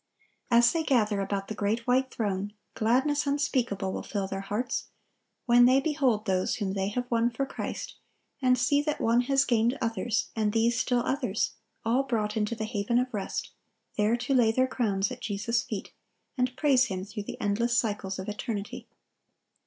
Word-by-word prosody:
As 235 -1 +6
they 330 - 0
gather 220 -9 +2
about 195 0 -2
the - - -4
great 215 +3 -1
white 260 +1 +2
throne, 205 -3 -2 0.2
gladness 265 +6 +1
unspeakable 245 -9 0
will - - -3
fill 200 -2 -3
their 195 0 -4
hearts, 210 +5 -2 0.6
when 245 0 +6
they 260 +2 +5
behold 270 -7 +1
those 185 -2 +1
whom 200 -5 -2
they 195 -1 -1
have 245 +5 -2
won 230 0 +3
for 245 +3 -2
Christ, - - -6 0.4
and 255 -1 +4
see 270 +4 +3
that 300 0 -2
one 230 +2 +3
has 275 +2 +2
gained 235 +2 +2
others, 230 -1 -1
and 215 -2 0
these 230 +1 +2
still 245 -1 +1
others, 250 -7 0 0.3
all 235 +4 +3
brought 225 -5 -1
into 215 +1 0
the 220 -1 -3
haven 215 +1 0
of 250 0 0
rest, 200 -2 -3 0.4
there 215 +3 +2
to 245 +3 -1
lay 240 -4 +4
their 255 +3 +2
crowns 210 -7 0
at - - -7
Jesus' 225 +3 -1
feet, - - -6 0.4
and 250 -1 -1
praise 270 -4 +4
Him 190 -5 -4
through 210 0 -6
the - - -7
endless 230 +3 +1
cycles 205 -4 -1
of 190 - -6
eternity. 220 +3 -5
230 Hz, 180 wpm, -28 LUFS, 205-255 Hz, 0.6 s, As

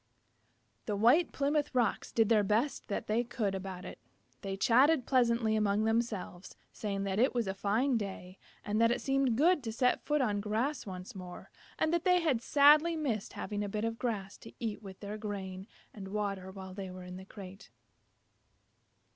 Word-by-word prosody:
The 210 - 0
White 245 - +4
Plymouth 285 0 0
Rocks 240 -4 0
did 225 -2 +2
the 215 -3 +4
best 220 +8 0
that 205 - -3
they 225 +3 +1
could 225 -4 -2
about 190 -1 -6
it. - - -9 0.4
They 195 -1 -4
chatted 260 +6 +4
pleasantly 235 -4 +2
among 210 0 +2
themselves, 220 -5 -2 0.2
saying 200 -2 -3
that 195 +1 -1
it 255 +2 +3
was 235 -2 +1
a 190 - -2
fine 225 +7 +1
day, 190 -3 -6 0.3
and 210 +2 0
that 230 - +5
it 240 - 0
seemed 270 -4 +1
good 335 +3 +4
to 225 - -3
set 250 +3 +1
foot 300 0 +1
on 210 -6 0
grass 220 +7 -2
once 185 -1 -7
more, 180 -2 -10 0.3
and 315 - +1
that 340 -1 +1
they 360 -1 +4
had 295 -9 +1
sadly 300 +5 +5
missed 255 -10 -2
having 205 -1 -4
a 205 - -3
bit 210 +2 -2
of 230 0 -3
grass 205 -6 -3
to - - -12
eat 220 -4 -3
with 190 -3 -11
their 210 +1 -6
grain 195 -2 -5 0.3
and 195 -3 -8
water 195 -2 -3
while 190 -1 -9
they 195 -1 -6
were 185 0 -9
in 180 0 -8
the 190 - -10
crate. 195 0 -11
215 Hz, 190 wpm, -32 LUFS, 195-250 Hz, 0.4 s, that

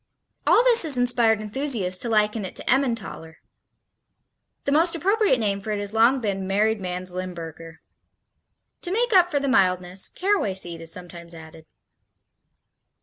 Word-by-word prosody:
All 475 - +5
this 485 -2 +5
has 300 -6 +1
inspired 240 -3 +2
enthusiasts 215 -5 -1
to 235 - -3
liken 215 0 +1
it 185 - -6
to - - -6
Emmentaler. 230 -11 -1 1.3
The 280 - -2
most 330 +4 +3
appropriate 395 - +2
name 200 -3 -1
for 200 - -8
it 210 -1 -2
has 205 0 -5
long 235 +4 +4
been 195 -4 -3
"married 210 +2 0
man's 180 0 -5
Limburger." 165 -3 -8 1.0
To 355 - -3
make 470 +3 0
up 360 -2 +5
for 290 -4 0
the 280 - -3
mildness 185 -5 +1
caraway 370 - -1
seed 175 -3 -3
is 165 0 -5
sometimes 170 -1 -7
added. 160 0 -13
210 Hz, 150 wpm, -23 LUFS, 180-275 Hz, 1.3 s, All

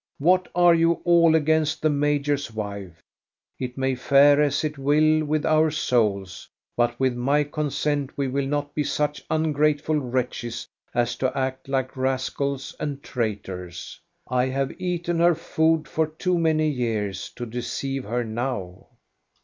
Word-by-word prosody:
What 180 +5 +3
are 175 -1 +6
you 165 0 +4
all 170 -2 +5
against 155 0 +1
the 155 - +4
major's 145 -2 0
wife? 100 -5 -6 0.6
It 125 0 -5
may 130 0 +1
fare 140 +3 +5
as 145 0 +1
it 150 -2 -3
will 155 +3 +3
with 155 0 -1
our 155 0 +4
souls, 105 - -1 0.3
but 120 0 0
with 130 -2 +1
my 140 +5 +2
consent 145 -1 -2
we 140 -1 0
will 135 +1 -1
not 145 0 -2
be 150 - 0
such 150 0 -1
ungrateful 150 -1 +1
wretches 125 -2 -3 0.3
as 120 0 +1
to 130 0 -1
act 130 0 -2
like 130 -1 -1
rascals 135 +1 -2
and 145 -1 -4
traitors. 95 - -5 0.3
I 125 0 +1
have 135 +1 -1
eaten 175 -1 -1
her 170 0 +5
food 160 -1 +1
for 160 -1 0
too 175 +3 -1
many 155 -1 +2
years 110 -8 -2
to 120 - -5
deceive 130 +3 -4
her 120 +3 -1
now." 110 -6 -4
140 Hz, 150 wpm, -24 LUFS, 125-155 Hz, 0.6 s, are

